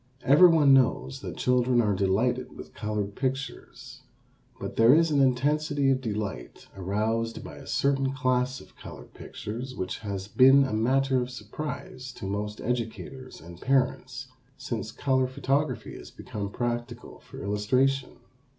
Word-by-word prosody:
Everyone 150 -1 +6
knows 120 - +2
that - - -7
children 125 -1 +2
are 105 -3 +2
delighted 115 +7 0
with - - -10
colored 105 -2 -3
pictures. 135 0 -5 0.6
But - - -6
there 115 +5 +6
is 165 0 +3
an 145 -2 +3
intensity 140 +2 +2
of 130 0 0
delight 105 - -5
aroused 110 +4 -2
by - - -9
a - - -12
certain 135 -1 +1
class 130 -1 0
of - - -17
colored - - -11
pictures 125 +5 -7
which 95 - -4
has 100 -3 -5
been 135 +6 +6
a 130 - -2
matter 130 +4 +2
of 125 - -4
surprise 130 +2 -7
to 110 - -8
most 105 +2 -4
educators 125 +2 -4
and 85 +2 -12
parents 130 0 0 0.3
since 120 -5 -4
color 130 0 +1
photography 135 +3 -1
has - - -10
become 100 -1 -6
practical 120 +2 -4
for - - -11
illustration. 125 +7 0
125 Hz, 140 wpm, -27 LUFS, 110-135 Hz, 0.6 s, Everyone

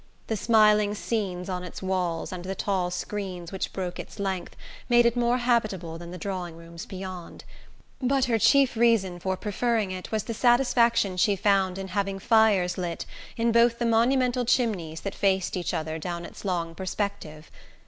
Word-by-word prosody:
The 220 - -2
smiling 210 -1 +4
scenes 195 -5 -3
on 180 -1 -3
its 180 - -8
walls 180 -3 -1
and 180 -1 -6
the 190 +1 -4
tall 190 -4 -1
screens 180 -2 -5
which 190 -1 -3
broke 180 -2 -4
its - - -8
length 195 -3 -3 0.3
made 240 0 +5
it 235 0 +3
more 240 0 +2
habitable 215 -9 0
than 170 0 -9
the 180 - -7
drawing 180 -3 -5
rooms 170 +2 -10
beyond; 185 -3 -8 0.6
but 265 +1 +2
her 230 -2 +1
chief 270 +3 +4
reason 220 -6 +2
for 190 +1 -2
preferring 215 0 -1
it 185 0 -7
was 215 -2 0
the 230 - -4
satisfaction 235 -4 +3
she 205 +2 +3
found 195 -1 +2
in 190 0 -5
having 195 -1 -1
fires 200 -5 +3
lit 170 -2 -3 0.3
in 230 0 +2
both 235 0 +4
the 235 - -1
monumental 245 +2 +2
chimneys 200 -10 0
that 195 - -4
faced 190 -2 +1
each 180 -2 -2
other 160 0 -3
down 170 +1 -4
its - - -11
long 170 -4 -2
perspective. 185 -4 -5
195 Hz, 175 wpm, -26 LUFS, 180-230 Hz, 0.6 s, made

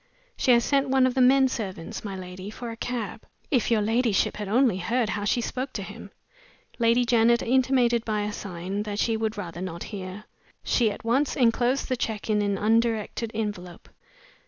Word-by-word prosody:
"She - - -1
has 235 -1 +5
sent 275 -1 +1
one 265 -1 +4
of 255 - +1
the 260 - +2
men 265 +1 +6
servants, 190 -9 -5
my 200 -2 -5
lady, 185 +1 -8
for 235 +2 -7
a - - -7
cab. 230 -3 -4 0.3
If 250 -6 +2
your 220 -3 +2
ladyship 225 -1 +1
had 210 -1 -4
only 230 -1 +3
heard 230 +4 0
how 205 -1 -2
she 240 +3 +1
spoke 255 +3 -4
to - - -4
him!" - - -10 0.7
Lady 235 +1 +3
Janet 235 0 +3
intimated 250 -2 +2
by 215 -2 -1
a 205 0 -3
sign 190 +1 -4
that 210 -1 -4
she 225 +1 +1
would 220 0 -2
rather 175 -3 -6
not 170 -2 -5
hear. 195 0 -7 0.4
She 235 -3 +2
at 220 - -8
once 265 +6 +1
inclosed 245 +1 +2
the 255 - 0
check 220 -2 -3
in 210 -1 +2
an 200 -1 0
undirected 225 +1 +1
envelope. 195 -5 -5
225 Hz, 190 wpm, -26 LUFS, 205-245 Hz, 0.7 s, men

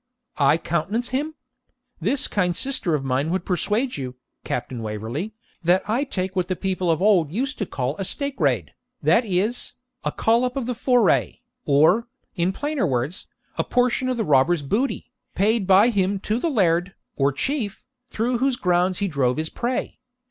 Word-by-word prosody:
'I 140 +2 +4
countenance 175 +9 -1
him? 295 +5 -2 0.6
This 230 - +2
kind 180 -4 0
sister 240 - +1
of 140 - -2
mine 135 +3 0
would 185 +1 -1
persuade 210 - 0
you, 130 -2 -5 0.3
Captain 120 -1 -4
Waverley, 115 - -4 0.3
that 180 +4 +2
I 240 +7 +1
take 190 -7 -3
what 180 -1 0
the 185 - -1
people 185 -1 -1
of 165 +2 +1
old 190 -8 +4
used 270 - -2
to 205 - -2
call 130 +2 -2
"a 195 - -2
steakraid," 150 - 0 0.3
that 170 - +4
is, 205 +5 -1 0.3
a - - -1
"collop 245 +3 +1
of 265 - -2
the 250 - -1
foray," 225 - +2 0.2
or, 160 - +4 0.3
in 175 0 +1
plainer 290 0 -1
words, 135 +6 -2 0.3
a - - +3
portion 250 +1 +1
of 255 - -1
the 225 - 0
robber's 150 +2 +3
booty, 235 - -1 0.2
paid 210 0 +2
by 195 +5 +6
him 200 -3 +1
to 215 +3 -1
the 335 - 0
Laird, 180 - +1 0.2
or 140 0 +2
Chief, 220 - -3 0.2
through 235 +2 -1
whose 265 0 +2
grounds 180 -3 +1
he 200 - 0
drove 135 -6 0
his 160 0 -2
prey. 245 +1 -3
190 Hz, 170 wpm, -23 LUFS, 155-240 Hz, 0.6 s, by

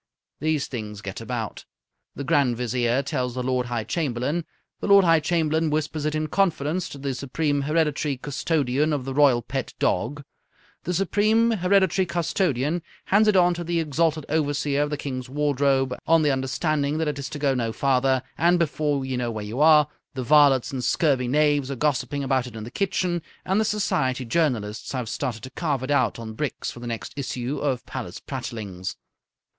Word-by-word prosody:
These 155 -1 0
things 105 -4 -6
get 100 +2 -6
about. 115 -2 -4 0.5
The 140 - -4
Grand 135 -5 +2
Vizier 125 +2 0
tells 130 -4 -2
the 125 - -2
Lord 125 -1 0
High 120 -2 -2
Chamberlain; 145 +4 -1 0.3
the - - -3
Lord 200 -1 +7
High 165 -1 +5
Chamberlain 160 0 +1
whispers 155 0 -2
it 155 0 0
in 155 0 0
confidence 170 0 0
to - - -8
the 140 -1 -3
Supreme 140 +3 -1
Hereditary 150 -1 0
Custodian 145 +1 0
of 135 -4 -2
the 135 - -3
Royal 135 -4 +4
Pet 130 -1 -4
Dog; 140 +10 0 0.6
the 180 - -1
Supreme 215 +5 +3
Hereditary 190 -2 +2
Custodian 170 -3 0 0.2
hands 210 +3 +4
it 210 - +4
on 180 -1 +5
to 175 0 -4
the 170 0 0
Exalted 155 0 0
Overseer 145 -2 0
of 150 - 0
the 150 - -2
King's 130 -3 -5
Wardrobe 140 -2 +1
on 165 -1 +5
the 150 - +3
understanding 140 +3 0
that 160 -1 0
it 145 -1 -2
is 135 - -5
to - - -6
go 140 -2 +1
no 115 -3 -1
farther; 130 0 +2 0.2
and, 175 +3 +4
before 150 -4 0
you 130 -1 -2
know 120 -1 -1
where 110 -2 -4
you 110 +5 -5
are, 150 -2 +7 0.3
the 130 - -3
varlets 140 -2 +5
and 130 -2 -3
scurvy 130 -1 +2
knaves 145 0 +2
are 140 - -3
gossiping 145 +1 0
about 130 -2 +1
it 120 - -11
in 110 - -6
the 120 - -8
kitchens, 180 -3 0 0.2
and 190 +3 +2
the - - +1
Society 135 -12 0
journalists 115 -8 -1
have 125 -3 -3
started 115 -1 -3
to 130 - -8
carve 145 -6 -2
it 130 - -3
out 130 -4 +2
on 115 -1 -7
bricks 140 +4 -3
for - - -11
the 120 - -7
next 115 -1 -5
issue 130 -1 -3
of 135 -4 -1
Palace - - -6
Prattlings. 95 -5 -5
145 Hz, 190 wpm, -24 LUFS, 125-160 Hz, 0.6 s, Lord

